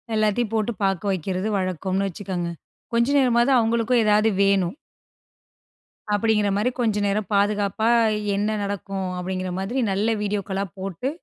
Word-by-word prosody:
எல்லாத்தையும் 215 +1 +1
போட்டு 220 +1 0
பார்க்க 195 +1 0
வெக்கிறது 185 +2 -2
வழக்கம்னு 190 +1 -1
வச்சுக்கங்க. 180 -2 -4 0.4
கொஞ்ச 235 +1 +3
நேரமாவது 245 0 +3
அவுங்களுக்கும் 230 +1 +2
ஏதாவது 215 +1 +4
வேணும். 195 -1 +2 1.4
அப்பிடிங்கிறமாரி 210 0 +2
கொஞ்சம் 210 -4 +1
நேரம் 200 +1 -1
பாதுகாப்பா, 205 +2 +1 0.5
என்ன 210 +2 0
நடக்கும் 195 -1 -4
அப்பிடிங்கிறமாதிரி, 185 +5 -3
நல்ல 215 +4 +1
வீடியோக்களா 200 -1 -2
போட்டு 195 +7 -3
205 Hz, 110 wpm, -23 LUFS, 190-220 Hz, 1.4 s, ஏதாவது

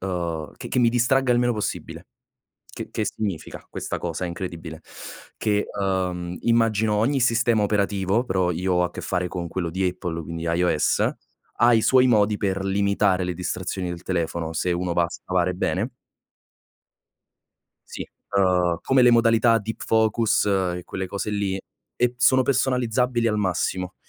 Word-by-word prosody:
uhm, 85 -4 -3
che - - -8
che - - -1
mi 120 - +5
distragga 125 +2 +2
il 120 - +3
meno 120 0 +2
possibile. 105 -3 -5 0.7
Che - - -6
che - - -2
significa 100 -7 -4
questa - - -4
cosa 90 - -3
incredibile? 85 -2 -6 0.6
Che, 105 -1 0
ehm 90 -2 -2
immagino 110 -2 +2
ogni 135 +7 +1
sistema 120 -2 +2
operativo, 100 +1 +1
però 95 -5 +1
io 90 +2 -1
ho 90 0 +3
a 90 - 0
che - - -8
fare 90 -1 -1
con 90 -1 -5
quello 85 -1 -3
di 95 +2 0
Apple, 90 -2 -4
quindi 85 +2 -6
iOS, 85 -2 +2 0.5
ha 120 0 +5
i 110 - +4
suoi 130 +2 +5
modi 105 -3 +3
per 95 -1 -1
limitare 100 -1 +1
le 90 0 -2
distrazioni 90 +1 -3
del 85 -1 -6
telefono, 85 -2 -2
se 90 +2 0
uno 85 0 -1
va 85 - +2
a 85 - -2
scavare 90 0 -1
bene. 90 - -1 2.0
Sì, - - -6 0.3
ehm, 90 -3 +2
come 130 -1 +3
le 125 - +7
modalità 115 0 +4
deep 110 +1 -5
focus 110 -1 +2
e 90 -3 0
quelle 95 -1 -4
cose 100 +2 -4
lì 100 -2 -1 0.4
e 120 0 +2
p - - -25
sono 130 +1 +5
personalizzabili 125 -2 +1
al 105 -1 0
massimo, 95 -1 -1
95 Hz, 160 wpm, -24 LUFS, 90-115 Hz, 2.0 s, le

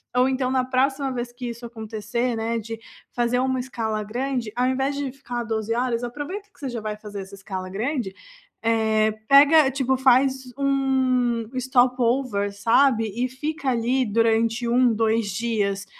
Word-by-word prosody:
ou 250 +1 +4
então 260 -1 0
na 255 -1 +1
próxima 270 +2 +1
vez 240 -1 -4
que 245 0 -6
isso 235 +1 -8
acontecer, 230 +1 -3
né, 225 +1 -1
de 225 +1 -6 0.4
fazer 240 0 +1
uma 260 0 0
escala 220 -4 -3
grande, 245 +1 -3
ao 250 +1 +1
invés 265 +2 0
de 280 -1 -2
ficar 245 -3 -5
12h 220 0 -2
horas, 245 -1 -1
aproveita 295 - -6
que - - -25
você 280 - -4
já 235 -3 -5
vai 210 0 -4
fazer 205 -2 -7
essa 190 +1 -11
escala 190 -1 -6
grande, 225 +1 -2 0.5
eh, 220 -1 +2 0.2
pega, 285 +1 +7
tipo 265 -1 0
faz 260 0 +3
um 260 -4 +1
stop-over, 250 -4 +1
sabe, 225 +3 +3
e 250 +1 -1
fica 295 +2 -3
ali 250 +2 +1
durante 230 +2 +1
1, 245 -1 +4
2 225 0 +1
dias 205 -2 -1
245 Hz, 160 wpm, -24 LUFS, 225-260 Hz, 0.5 s, pega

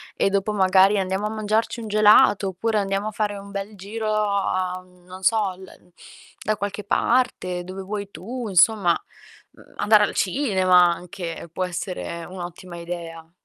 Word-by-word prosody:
E 195 - +2
dopo, 200 +2 0
magari: 190 +1 +4
"Andiamo 190 +2 -1
a - - -4
mangiarci 220 +2 -1
un 220 - -6
gelato!" 210 -1 +5
Oppure: 215 +4 -1
"Andiamo 195 +2 -1
a - - -8
fare 205 -1 -2
un 200 0 -10
bel 200 +1 -5
giro 215 +3 -4
a" 195 -3 0
mhmm, 180 -1 -24
non 185 +1 -11
so, 225 - +3
"al 185 +1 -10
en 180 - -19 0.5
da 215 -1 0
qualche 205 0 -4
parte, 195 -7 0
dove 190 +1 -7
vuoi 200 0 -5
tu", 225 +8 -6
insomma, 190 -1 +4 0.5
mhmm, - - -20
andare 210 0 +5
al - - -6
cinema 185 -5 +3
anche 175 -2 -7
può 185 - -2
essere 175 -2 -5
un'ottima 175 -1 -8
idea. 165 -1 -7
195 Hz, 165 wpm, -23 LUFS, 180-210 Hz, 0.5 s, gelato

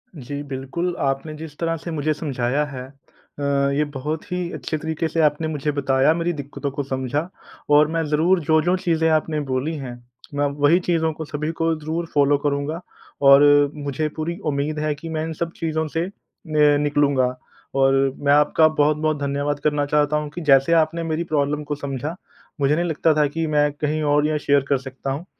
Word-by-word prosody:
जी, 145 0 -6
बिल्कुल 140 +6 -3
आपने 135 +3 -1
जिस 155 -2 -9
तरह 165 -1 -1
से 170 +2 -7
मुझे 155 -1 0
समझाया 140 -2 -1
है, 130 -3 -7
अ, 140 +1 -18 0.3
ये 150 +2 +2
बहुत 155 +4 -3
ही 180 -1 -2
अच्छे 155 - -3
तरीक़े 160 +1 -2
से 165 +1 -3
आपने 150 +1 +2
मुझे 150 -1 -2
बताया, 135 +1 +2
मेरी 170 +1 -1
दिक्कतों 145 -1 -5
को 140 +1 -3
समझा 135 +4 -2 0.4
और 150 +1 +6
मैं 165 - +1
ज़रूर 160 +5 +2
जो-जो 160 +3 +3
चीज़ें 165 -3 +1
आपने 155 0 +1
बोली 135 +5 -1
हैं 130 -4 -6 0.4
मैं 145 0 +1 0.2
वहीं 160 +5 +5
चीज़ों 165 -2 +1
को, 160 +1 -6
सभी 150 +2 -3
को 165 0 0
ज़रूर 160 +3 -3
फ़ॉलो 145 0 +4
करूँगा। 145 +3 -2 0.5
और 140 +1 +9 0.3
मुझे 145 +1 -2
पूरी 170 +3 -3
उम्मीद 150 +1 -1
है 150 0 0
कि 165 +3 -9
मैं 155 -1 -2
इन 160 - -4
सब 170 +2 -3
चीज़ों 160 -1 -2
से 165 +2 -2 0.5
मैं 150 -1 +4
निकलूँगा 145 -3 +2 0.5
और 135 0 +4 0.2
मैं 145 0 +2
आपका 150 +2 +5
बहुत-बहुत 155 0 +1
धन्यवाद 145 +1 -1
करना 150 -1 +1
चाहता 150 +1 +2
हूँ 150 -1 -3
कि 175 - -4
जैसे 135 +4 +5
आपने 165 +1 +2
मेरी 165 +1 -1
प्रॉब्लम 150 -2 -1
को 145 0 -3
समझा 140 +2 -4 0.5
मुझे 140 +2 +3
नहीं 175 +2 0
लगता 160 -1 +2
था 150 - +4
कि 160 +3 -3
मैं 150 -1 +2
कहीं 150 +1 -2
और 150 0 +3
ये 155 -1 0
शेयर 140 -1 +3
कर 140 - +3
सकता 135 +1 -6
हूँ। 150 +6 -4
150 Hz, 190 wpm, -22 LUFS, 140-160 Hz, 0.5 s, और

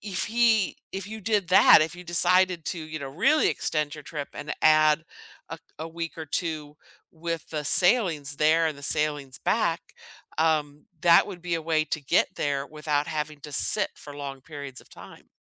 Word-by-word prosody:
if 190 -2 -3
he 225 -3 +2 0.2
if 195 +1 -5
you 220 0 -7
did 205 -3 0
that, 180 -3 +7
if 160 +3 -4
you 180 - -11
decided 180 0 +2
to, 180 - -3
you 155 -1 -6
know, 140 - -5
really 275 - +3
extend 150 -1 -2
your 150 - -11
trip 145 -3 -6
and 150 +1 -6
add 155 0 +5 0.5
a - - -7 0.2
a 160 +1 -5
week 165 0 -6
or 160 -1 -7
2 150 -1 -4 0.3
with 165 -1 -5
the 150 -2 -4
sailings 165 - +2
there 160 +2 +3
and 155 -3 -4
the - - -13
sailings 145 -2 -2
back, - - 0 0.6
um, 150 -2 0 0.2
that 170 +1 +6
would 180 -4 -9
be 175 -1 -2
a 165 - -3
way 155 -1 +1
to 155 0 -3
get 170 - +3
there 140 -1 -1
without 150 -1 -2
having 150 -1 -4
to 150 - -10
sit 210 +9 +1
for 145 - -11
long 140 -2 -7
periods 140 -2 -9
of - - -21
time. - - -14
155 Hz, 190 wpm, -26 LUFS, 150-175 Hz, 0.6 s, that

